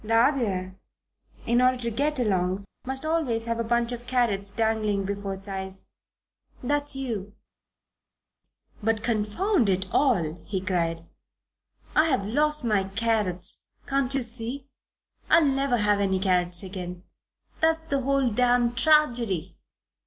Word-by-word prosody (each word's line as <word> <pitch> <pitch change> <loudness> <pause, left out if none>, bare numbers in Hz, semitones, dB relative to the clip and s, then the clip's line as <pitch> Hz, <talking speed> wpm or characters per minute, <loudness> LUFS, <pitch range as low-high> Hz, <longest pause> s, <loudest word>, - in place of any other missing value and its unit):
The 225 +1 0
other, 205 -7 +1 0.7
in 240 +1 +3
order 255 0 +4
to 235 -1 -3
get 290 +6 0
along, 190 -4 0 0.2
must 265 +3 -1
always 305 -8 0
have 230 0 -2
a - - +1
bunch 235 +1 +1
of 240 0 -7
carrots 230 -6 +1
dangling 215 -2 0
before 200 0 -3
its 195 +2 -10
eyes. 190 -1 -6 0.7
That's 290 +2 +1
you." 220 -7 -4 1.5
"But 225 0 0
confound 230 - +1
it 190 0 +1
all!" 175 - +1
he 195 -2 -3
cried, 170 -3 -1 0.9
"I've 300 -10 +3
lost 300 +6 +1
my 210 -4 +1
carrots 195 -3 -1 0.3
can't 270 -2 0
you 270 - +1
see? 235 +3 -3 0.6
I'll 330 - +6
never 270 -2 +1
have 210 -1 +2
any 190 -1 +1
carrots 180 -1 +1
again. 180 -2 -7 0.6
That's 320 0 +2
the 280 -4 -1
whole 270 -2 +1
damned 245 +1 +2
tragedy." 240 - +2
225 Hz, 130 wpm, -26 LUFS, 195-260 Hz, 1.5 s, I'll